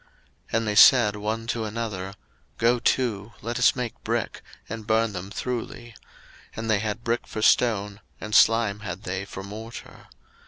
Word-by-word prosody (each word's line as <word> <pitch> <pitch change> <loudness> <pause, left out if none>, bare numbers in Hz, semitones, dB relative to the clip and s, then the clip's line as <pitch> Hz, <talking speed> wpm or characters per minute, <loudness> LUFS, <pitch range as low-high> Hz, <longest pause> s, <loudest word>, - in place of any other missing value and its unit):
01:011:003 - - -31 0.5
And 115 -1 -1
they 105 - 0
said 105 -1 +7
one 110 +2 -3
to 115 -1 -2
another, 105 -3 -4 0.4
Go 120 +1 +3
to, 115 -4 0
let 120 +2 -3
us 125 - +5
make 125 -3 -5
brick, - - -2 0.3
and 110 -2 -7
burn 110 -1 +2
them 95 +1 -6
thoroughly. 120 0 -5 0.6
And 110 0 -2
they 105 - +3
had 110 +2 -3
brick 120 0 -1
for 110 - -4
stone, 105 -4 +2 0.2
and 110 - -7
slime 115 -3 +4
had 95 -3 -7
they 95 +1 -4
for 95 0 -8
morter. 110 +4 -10
110 Hz, 165 wpm, -25 LUFS, 105-115 Hz, 0.6 s, said